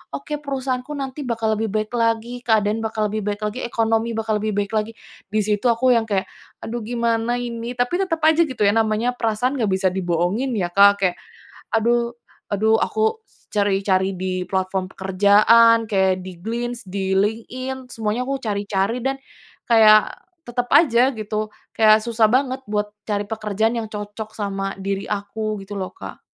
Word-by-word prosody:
"Oke, 295 +1 -5
perusahaanku 270 0 -3
nanti 275 +1 -5
bakal 225 -2 0
lebih 225 - 0
baik 215 +2 -2
lagi, 230 +1 0
keadaan 220 -2 +1
bakal 220 -1 -1
lebih 215 - -2
baik 205 +1 -2
lagi, 210 +4 -3
ekonomi 225 -1 0
bakal 220 -1 0
lebih 215 -1 -1
baik 200 0 -1
lagi," 215 +1 0 0.4
di 215 +1 0
situ 210 +3 +1
aku 245 +2 +3
yang 225 -1 +1
kayak, 195 -2 0 0.4
"Aduh, 235 +2 -4
gimana 235 +1 0
ini?" 235 0 -5
Tapi 295 +10 0
tetep 345 -4 0
aja 320 +1 +5
gitu 255 -6 -7
ya 200 - +5
namanya 225 +2 +1
perasaan 245 +2 0
nggak 220 - +1
bisa 190 0 +2
dibohongin 190 +8 -1
ya, 175 -2 -2
Kak, 200 0 +6
kayak, 180 - +1 0.6
aduh 235 +1 +1 0.4
aduh, 220 +2 +3
aku 220 - -1 0.2
cari-cari 195 -2 +1
di 185 0 -3
platform 190 0 -2
pekerjaan 215 +4 +4
kayak 190 -3 +2
di 185 -1 -9
Glints, 240 +1 -3
di 190 0 -2
LinkedIn 250 +6 -2
semuanya 225 +2 -3
aku 275 -1 -2
cari-cari, 205 +2 -1
dan 270 +2 -1 0.5
kayak 215 -2 +6 0.3
tetep 245 -1 -3
aja 255 -4 +4
gitu 215 0 -3 0.2
kayak 215 -1 +5
susah 230 -1 +2
banget 260 +2 +1
buat 210 0 -2 0.2
cari 205 -1 -1
pekerjaan 220 +2 -1
yang 220 - -4
cocok 210 +1 -7
sama 195 -2 -3
diri 195 +1 -3
aku 210 +1 -3
gitu 200 0 -6
loh, 185 - -5
Kak. - - -9
220 Hz, 165 wpm, -21 LUFS, 205-240 Hz, 0.6 s, Kak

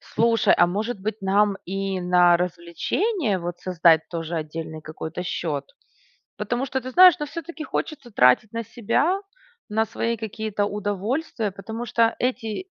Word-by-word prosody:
Слушай, 230 0 +2
а 175 - +5
может 210 +4 -3
быть 215 +1 -4
нам 200 +1 +2
и 195 0 -3
на 180 -1 +5
развлечение, 185 - -1
вот, 175 0 -5
создать 170 -3 +4
тоже 165 0 -4
отдельный 160 0 -5
какой-то 160 +2 -6
счет? 150 -6 -3 0.7
Потому 240 +6 -2
что, 265 0 -2
ты 255 +1 -7
знаешь, 365 +4 +8
но 295 - -2
всё-таки 325 +1 -7
хочется 275 -6 -4
тратить 200 - +4
на 230 0 -3
себя, 300 - 0 0.5
на 220 +1 +1
свои 230 +1 -2
какие-то 215 -1 -3
удовольствия, 210 - -2
потому 220 +5 -6
что 230 0 +2
эти, 245 - -2
205 Hz, 145 wpm, -24 LUFS, 175-235 Hz, 0.7 s, знаешь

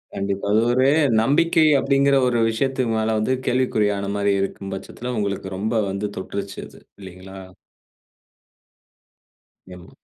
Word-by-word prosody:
கண்டிப்பா. 100 0 -3
அது 110 - +4
ஒரு 130 +1 +2 0.4
நம்பிக்கை 160 +5 +3
அப்பிடிங்கிற 140 0 +2
ஒரு 120 -1 +1
விஷயத்துக்கு 130 +1 -1
மேல 110 0 0
வந்து 130 +4 0
கேள்விக்குறியானமாரி 100 -5 0
இருக்கும் 95 0 -5
பட்சத்தில 125 +5 -7
உங்களுக்கு 100 -1 -3
ரொம்ப 110 +4 -2 0.2
வந்து 100 +2 -3
தொட்டுருச்சு 100 +1 -6
அது. - - -17 0.2
இல்லேங்களா? 95 +1 -11 2.4
எம் 90 - -14
105 Hz, 115 wpm, -22 LUFS, 100-130 Hz, 2.4 s, அது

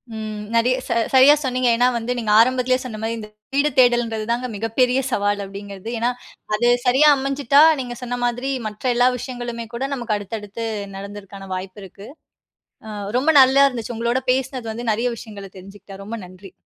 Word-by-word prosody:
ம் 215 -1 -5
நெறயா 245 +2 +3
ச - - -5 0.2
சரியா 265 +2 +8
சொன்னீங்க. 255 -1 0
ஏன்னா 245 +1 +4
வந்து 235 +2 -3
நீங்க 220 -3 -1
ஆரம்பத்திலயே 255 +2 +3
சொன்ன 215 -4 -6
மாதிரி, 225 +1 -2
இந்த 215 - -8 0.3
வீடு 285 +2 +3
தேடல்ன்றது 240 -3 +3
தாங்க 245 +2 -1
மிகப்பெரிய 245 +5 +1
சவால் 205 -1 0
அப்படிங்கிறது. 200 +1 -9
ஏன்னா, 235 - +1 0.5
அது 240 +3 +1 0.2
சரியா 265 +5 +5
அமைஞ்சுட்டா 275 +1 +2 0.2
நீங்க 245 -2 -5
சொன்ன 245 0 -4
மாதிரி 245 +3 -2 0.2
மற்ற 210 0 -10
எல்லா 245 +1 +4
விஷயங்களுமே 240 -2 -6
கூட 235 - -4
நமக்கு 240 -5 -2
அடுத்தடுத்து 210 +2 -6 0.3
நடக்குறதுக்கான 195 0 -9
வாய்ப்பு 185 +2 -7
இருக்கு. 195 +2 -12 0.8
அ - - -7 0.3
ரொம்ப 275 +5 +1
நல்லா 265 +1 +5
இருந்துச்சு. 240 -2 -5
உங்களோட 235 +2 0
பேசுனது 260 -2 -2
வந்து 235 0 -4
நிறைய 230 +3 0
விஷயங்களை 205 -4 -10
தெரிஞ்சுகிட்ட, 195 +1 -12
ரொம்ப 220 +3 -6
நன்றி. 185 +2 -14
235 Hz, 165 wpm, -21 LUFS, 210-250 Hz, 0.8 s, சரியா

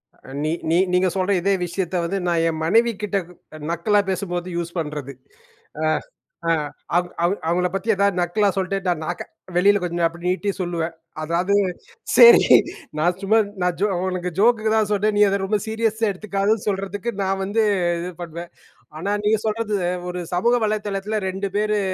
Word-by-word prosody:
அ - - -17
நீ 155 - 0 0.2
நீ 165 - +3 0.2
நீங்க 180 +1 +3
சொல்ற 190 +1 0
இதே 195 +2 +2
விஷயத்த 180 +1 -3
வந்து, 190 +4 -1
நான் 170 -1 +2
என் 160 -1 -4
மனைவிகிட்ட 210 +1 +2
க் 180 - -15 0.4
நக்கலா 190 +5 +2
பேசும்போது 180 -2 -3
யூஸ் 170 0 -3
பண்றது. 150 -3 -5 0.7
அ - - +2 0.6
அ - - +4 0.5
அவ 180 - +3 0.2
அவு 175 +3 +3
அவுங்கள 180 +2 +1
பத்தி 195 +2 -3
எதாவது 200 -1 +2
நக்கலா 200 +4 +2
சொல்லிட்டு 195 +1 0
நான் 175 -3 0
நக்க - - -4 0.4
வெளியில 200 +3 +5
கொஞ்சம் 170 -1 0
அப்படி 170 +1 -7
நீட்டி 200 +2 -1
சொல்லுவேன். 170 -2 -2 0.3
அதாவது 175 +5 0 0.6
சரி 470 0 +9 0.5
நான் 175 +3 +1
சும்மா 205 +3 +3 0.2
நான் 180 -1 0
ஜோ 210 - +4 0.2
உனக்கு 180 -1 -2
ஜோக்குக்கு 220 0 +3
தான் 215 -2 +2
சொன்னேன். 210 +1 +1
நீ - - +4
அத 200 +1 0
ரொம்ப 210 +2 0
சீரியஸா 220 0 0
எடுத்துக்காதன்னு 200 +2 -1
சொல்லறதுக்கு 200 +3 -2
நான் 195 0 -1
வந்து 215 +3 +1 0.4
இது 180 +1 -5
பண்ணுவேன். 170 0 -7 0.5
ஆனா 200 +5 -2
நீங்க 215 +1 +3
சொல்றது 215 -1 -1 0.3
ஒரு 180 0 -4
சமூக 195 +7 +2
வலைதளத்தில 210 0 -2
2 195 +1 -3
பேரு 210 0 +1
195 Hz, 165 wpm, -22 LUFS, 175-210 Hz, 0.7 s, சரி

